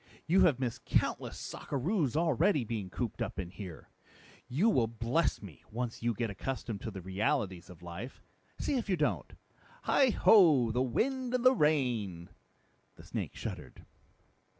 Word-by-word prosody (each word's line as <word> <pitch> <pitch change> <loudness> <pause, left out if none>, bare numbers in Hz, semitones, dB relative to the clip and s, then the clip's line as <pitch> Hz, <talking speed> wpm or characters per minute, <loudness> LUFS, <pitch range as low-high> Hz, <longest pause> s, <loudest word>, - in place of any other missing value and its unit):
You 185 +3 +5
have 150 -8 +3
missed 125 -3 -3
countless - - 0
sockeroos 150 - -2
already, 165 - +3
being 105 -4 -4
cooped 115 +4 -4
up - - -3
here. 90 -1 -7 0.6
You 155 - +2
will 125 - +3
bless 115 +6 0
me, 80 -10 -11
once 120 +1 -4
you 120 -1 0
get 115 0 -2
accustomed 115 -1 -4
to - - -4
the 95 -4 -8
realities 95 -1 -1
of 90 -1 -13
life 90 +9 -7 0.4
see 280 - 0
if 230 - -3
you 185 - +2
don't. 150 - -1 0.5
Heigh 270 -2 +4
ho 160 - +6
the 125 +3 +1
wind 250 - 0
and 250 - 0
the 255 - +8
rain!" 120 - 0 0.7
The - - -14
snake - - -5
shuddered. - - -7
125 Hz, 150 wpm, -32 LUFS, 105-165 Hz, 0.7 s, the